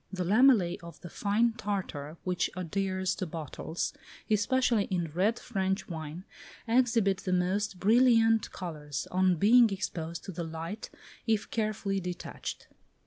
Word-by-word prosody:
The 185 -2 -2
lamellæ 215 -2 +4
of 170 -2 -11
the 175 - -9
fine 220 +3 +1
tartar 180 -8 -4
which 180 -1 0
adheres 190 +1 -1
to 185 - -3
bottles, 160 +1 -4 0.4
especially 220 0 +2
in 175 -4 -2
red 195 +8 +1
French 195 -3 -2
wine, 160 +1 -6 0.4
exhibit 230 -5 +3
the 185 - -4
most 185 +2 0
brilliant 225 +1 +4
colours, 150 -6 -5
on 185 0 +3
being 230 +7 +6
exposed 170 -4 -4
to 195 - -6
the 170 -1 -4
light, 165 +6 -6 0.4
if 220 -2 0
carefully 215 -3 -1
detached. 180 -1 -6
190 Hz, 135 wpm, -30 LUFS, 175-215 Hz, 0.4 s, being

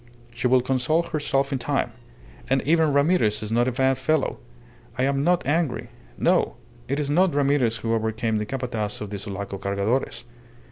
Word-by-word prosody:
She 125 - 0
will 125 0 +4
console 130 +6 +1
herself 140 -4 -1
in 135 - -1
time. 120 - -1 0.6
And 135 0 +2
even 160 0 +3
Ramirez 140 - +2
is 105 - -5
not 120 +2 +2
a - - +1
bad 130 +1 +1
fellow. 145 +2 0 0.6
I 125 - +1
am 140 +1 +1
not 175 -1 +2
angry. 135 -6 0 0.3
No! - - +2 0.3
It 140 +3 -1
is 145 -1 -1
not 175 0 +3
Ramirez 140 -5 +2
who 115 0 -2
overcame 110 0 0
the 105 - -3
Capataz 120 -5 -3
of 105 -1 -6
the 100 - -4
Sulaco 100 0 -5
Cargadores." 100 +8 -1
130 Hz, 175 wpm, -24 LUFS, 110-145 Hz, 0.6 s, will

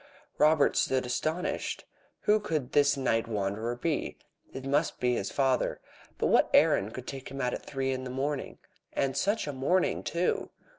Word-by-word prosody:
Robert 155 -1 +4
stood 130 -1 +1
astonished. 155 +8 -2 0.4
Who 215 +1 +4
could 155 -10 -2
this 145 0 +4
night 115 -4 +1
wanderer 110 +2 -2
be? 150 +4 -2 0.3
It 135 - -7
must 145 +4 0
be 125 0 +2
his 100 -4 -2
father. 135 -2 +1 0.4
But - - 0
what - - +4
errand 105 +3 +4
could 130 - -7
take 135 -1 -7
him 135 - -7
out 125 -2 0
at - - -4
three 135 -1 -2
in 130 0 -3
the 130 - -5
morning? 135 +2 -3 0.4
And 135 -1 0
such 200 +10 +1
a 145 - -4
morning, 160 +8 +1
too! 175 +1 -1
135 Hz, 170 wpm, -29 LUFS, 125-150 Hz, 0.4 s, Robert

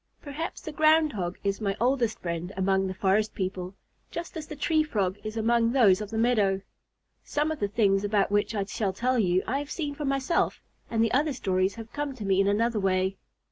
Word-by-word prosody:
Perhaps 295 +3 -5
the 315 - -6
Ground 310 0 +4
Hog 180 -3 -3
is 200 +1 -1
my 200 -2 -1
oldest 240 -2 +1
friend 170 +1 -3
among 190 0 +2
the 185 - -3
forest 205 +2 +1
people, 185 -1 -4 0.3
just 340 0 -6
as 315 -2 -6
the 305 - -7
Tree 315 +2 +2
Frog 205 -10 -1
is 215 +1 -5
among 230 +1 +2
those 210 -7 +5
of 210 - -5
the 220 - -4
meadow. 210 -5 +2 0.6
Some 300 +2 -1
of 315 - -4
the 205 - 0
things 200 -2 +2
about 205 -1 +1
which 205 +1 +1
I 200 - 0
shall 195 0 -2
tell 250 +5 +1
you, 185 -2 +2
I 270 +4 -1
have 290 0 -6
seen 295 -2 -3
for 295 +1 -5
myself, 275 +3 0 0.3
and 225 -1 +2
the 230 - +1
other 290 +3 +2
stories 190 -5 0
have 225 0 -10
come 290 -2 -3
to 215 -5 -6
me 195 0 +3
in 195 - +2
another 220 +2 +1
way. 190 0 +1
215 Hz, 220 wpm, -27 LUFS, 195-270 Hz, 0.6 s, those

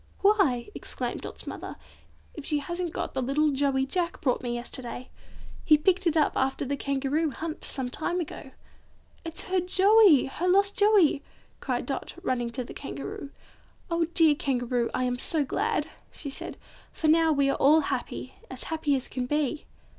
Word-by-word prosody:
"Why!" 390 - +3
exclaimed - - -4
Dot's - - -8
mother, - - -6 0.6
"if 305 - -8
she 300 - 0
hasn't 345 +4 -3
got - - -4
the 265 - -1
little 290 +4 +2
Joey 270 -1 +1
Jack 345 +4 -2
brought 255 -4 0
me 240 -1 -3
yesterday! 245 +1 -5 0.5
He 305 - +6
picked 365 +4 +2
it 325 -1 +2
up 305 - +2
after 265 +1 0
a 280 +2 -1
Kangaroo 280 +3 0
hunt 315 +3 -6
some 265 -2 -2
time 320 +8 -2
ago." 315 -4 -6 0.7
"It's 330 -1 -3
her 375 0 0
Joey; 380 - +5
her 335 +7 -3
lost 395 +2 +3
Joey!" 410 - +4 0.4
cried - - -2
Dot, - - -4
running 245 -6 -1
to 250 +2 -4
the - - -9
Kangaroo. 290 +4 -6 0.6
"Oh, 335 0 +2
dear 320 -3 +7
Kangaroo, 245 -4 -1
I 255 - -1
am 250 0 -1
so 300 +2 +1
glad!" - - 0 0.3
she 285 - -6
said, - - -6 0.3
"for - - -5
now 325 +1 +5
we 280 -2 +2
are - - -2
all 305 +3 +5
happy; 260 -1 -4 0.2
as 260 - -5
happy 300 -3 +1
as 260 - -2
can 250 -1 -3
be!" 295 +1 -1
295 Hz, 175 wpm, -27 LUFS, 265-335 Hz, 0.7 s, dear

